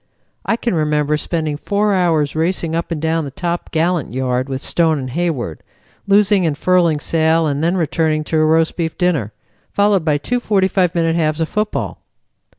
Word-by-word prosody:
I -, -, +1 dB
can 235 Hz, -1 st, -2 dB
remember 150 Hz, -2 st, +1 dB
spending 155 Hz, -1 st, -2 dB
four 205 Hz, +5 st, 0 dB
hours 165 Hz, -6 st, +1 dB
racing 165 Hz, 0 st, -1 dB
up 170 Hz, -, -2 dB
and 165 Hz, -3 st, -3 dB
down 160 Hz, +1 st, 0 dB
the 145 Hz, -, -5 dB
top 170 Hz, +5 st, -4 dB
gallant 165 Hz, -5 st, -1 dB
yard 130 Hz, 0 st, -1 dB
with 135 Hz, 0 st, -4 dB
Stone 165 Hz, -2 st, +1 dB
and 130 Hz, -2 st, -5 dB
Hayward, 140 Hz, -, -2 dB, 0.5 s
loosing 200 Hz, -1 st, +4 dB
and 155 Hz, -4 st, 0 dB
furling 175 Hz, -4 st, +2 dB
sail, 160 Hz, +1 st, +2 dB
and 145 Hz, 0 st, -1 dB
then 175 Hz, +3 st, +1 dB
returning 160 Hz, -2 st, 0 dB
to 160 Hz, -, -1 dB
a 155 Hz, -, +3 dB
roast 160 Hz, +1 st, +2 dB
beef 165 Hz, -2 st, -2 dB
dinner, 160 Hz, -, 0 dB, 0.4 s
followed 200 Hz, -3 st, +2 dB
by 150 Hz, -2 st, +2 dB
two 245 Hz, +12 st, -2 dB
45 190 Hz, -5 st, +1 dB
minute 165 Hz, -1 st, +1 dB
halves 155 Hz, -2 st, 0 dB
of 160 Hz, -, -1 dB
football. 210 Hz, 0 st, -2 dB
165 Hz, 180 wpm, -18 LUFS, 150-180 Hz, 0.5 s, loosing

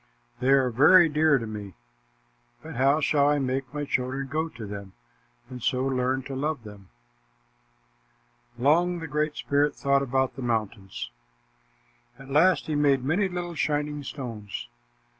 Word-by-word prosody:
They 125 Hz, +2 st, 0 dB
are 135 Hz, -2 st, +4 dB
very 165 Hz, +8 st, +6 dB
dear 155 Hz, -1 st, +3 dB
to 115 Hz, -, -4 dB
me, 105 Hz, -4 st, -7 dB, 0.9 s
but -, -, -8 dB
how 135 Hz, +5 st, +3 dB
shall 145 Hz, -1 st, +3 dB
I 145 Hz, -, +2 dB
make 130 Hz, -1 st, -2 dB
my 145 Hz, 0 st, -3 dB
children 135 Hz, +1 st, -2 dB
go 160 Hz, +3 st, -1 dB
to 115 Hz, -6 st, -9 dB
them 100 Hz, -1 st, -8 dB, 0.5 s
and 125 Hz, -1 st, -9 dB
so 130 Hz, +2 st, 0 dB
learn 130 Hz, 0 st, 0 dB
to 135 Hz, +1 st, -6 dB
love 145 Hz, -1 st, -2 dB
them?" 105 Hz, -3 st, -12 dB, 1.7 s
Long 170 Hz, +8 st, +3 dB
the 165 Hz, -, -6 dB
Great 150 Hz, +1 st, -1 dB
Spirit 145 Hz, +1 st, +1 dB
thought 140 Hz, 0 st, +2 dB
about 130 Hz, -1 st, 0 dB
the 135 Hz, -, -7 dB
mountains. 110 Hz, -, -3 dB, 1.1 s
At 135 Hz, 0 st, -12 dB
last, 170 Hz, +6 st, +4 dB
he 155 Hz, -, -3 dB
made 140 Hz, -3 st, +2 dB
many 180 Hz, +9 st, +1 dB
little 175 Hz, -1 st, -4 dB
shining 150 Hz, -1 st, -1 dB
stones. 115 Hz, -8 st, -7 dB
135 Hz, 150 wpm, -26 LUFS, 125-150 Hz, 1.7 s, very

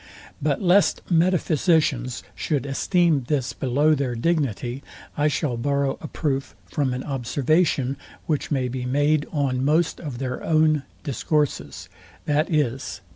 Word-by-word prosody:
But 145 Hz, +4 st, 0 dB
lest 185 Hz, +2 st, +4 dB
metaphysicians 160 Hz, -7 st, +2 dB
should 145 Hz, -5 st, -2 dB
esteem 155 Hz, 0 st, +2 dB
this 135 Hz, -4 st, 0 dB
below 145 Hz, +4 st, +2 dB
their 135 Hz, -4 st, -1 dB
dignity, 130 Hz, -3 st, -1 dB, 0.3 s
I 150 Hz, +1 st, +2 dB
shall 140 Hz, -3 st, -1 dB
borrow 140 Hz, +2 st, 0 dB
a 155 Hz, -, -5 dB
proof 135 Hz, -5 st, -2 dB
from 135 Hz, -4 st, -1 dB
an 125 Hz, -, -4 dB
observation, 140 Hz, +1 st, +1 dB, 0.3 s
which 150 Hz, -3 st, -1 dB
may 130 Hz, -4 st, 0 dB
be 125 Hz, 0 st, -4 dB
made 145 Hz, +4 st, +1 dB
on 135 Hz, -4 st, 0 dB
most 155 Hz, +4 st, +2 dB
of 145 Hz, -7 st, -6 dB
their 130 Hz, 0 st, -4 dB
own 155 Hz, -2 st, +3 dB, 0.2 s
discourses, 150 Hz, +1 st, -1 dB, 0.4 s
viz. 145 Hz, -4 st, 0 dB
145 Hz, 130 wpm, -24 LUFS, 130-155 Hz, 0.4 s, lest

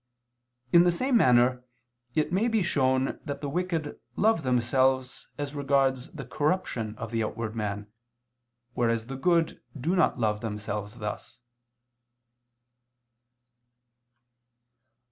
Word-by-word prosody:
In 170 Hz, -, +8 dB
the 175 Hz, -, +4 dB
same 255 Hz, +9 st, 0 dB
manner 125 Hz, -, +4 dB, 0.5 s
it 155 Hz, +2 st, +1 dB
may 205 Hz, +6 st, +2 dB
be 225 Hz, -4 st, +2 dB
shown 130 Hz, -5 st, +1 dB
that 140 Hz, -2 st, -5 dB
the 145 Hz, -, -4 dB
wicked 165 Hz, -1 st, -2 dB, 0.2 s
love 220 Hz, -4 st, +3 dB
themselves, 130 Hz, 0 st, +1 dB
as 145 Hz, -1 st, -4 dB
regards 135 Hz, -1 st, +1 dB
the 150 Hz, -5 st, -7 dB
corruption 145 Hz, -, -1 dB
of 115 Hz, -, -6 dB
the 115 Hz, -1 st, 0 dB
outward 110 Hz, 0 st, -4 dB
man, 105 Hz, -2 st, -3 dB, 0.9 s
whereas 115 Hz, -2 st, 0 dB
the 135 Hz, +2 st, -6 dB
good 165 Hz, +4 st, +1 dB, 0.2 s
do 165 Hz, +9 st, 0 dB
not 175 Hz, -, +3 dB
love 105 Hz, -3 st, 0 dB
themselves 105 Hz, 0 st, -4 dB
thus. 105 Hz, +1 st, -6 dB
130 Hz, 115 wpm, -27 LUFS, 115-165 Hz, 0.9 s, In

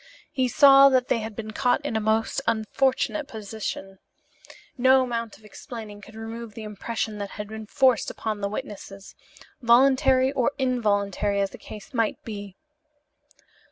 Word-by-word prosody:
He 260 Hz, -1 st, +1 dB
saw 275 Hz, +2 st, +7 dB
that 255 Hz, -2 st, +1 dB
they 235 Hz, -, +2 dB
had 220 Hz, -1 st, -6 dB
been 220 Hz, 0 st, -6 dB
caught 250 Hz, +4 st, 0 dB
in 260 Hz, -, -2 dB
a -, -, +2 dB
most 220 Hz, +4 st, 0 dB
unfortunate 260 Hz, +6 st, 0 dB
position. 205 Hz, -3 st, -6 dB, 0.8 s
No 260 Hz, +1 st, +5 dB
amount 235 Hz, -3 st, -4 dB
of 215 Hz, -, -21 dB
explaining 210 Hz, -1 st, -9 dB
could 220 Hz, +2 st, -14 dB
remove 225 Hz, 0 st, -7 dB
the 225 Hz, -, -7 dB
impression 215 Hz, +1 st, -4 dB
that 200 Hz, -1 st, -4 dB
had 210 Hz, 0 st, -5 dB
been 220 Hz, 0 st, -8 dB
forced 260 Hz, 0 st, +2 dB
upon 215 Hz, -2 st, -4 dB
the 200 Hz, -, -1 dB
witnesses, 195 Hz, -1 st, -8 dB, 0.5 s
voluntary 260 Hz, +2 st, +4 dB
or 275 Hz, 0 st, 0 dB
involuntary 205 Hz, -6 st, 0 dB
as 195 Hz, -1 st, 0 dB
the -, -, -12 dB
case 210 Hz, +3 st, -11 dB
might 225 Hz, -3 st, 0 dB
be. 205 Hz, -3 st, -7 dB
225 Hz, 155 wpm, -25 LUFS, 210-255 Hz, 0.8 s, saw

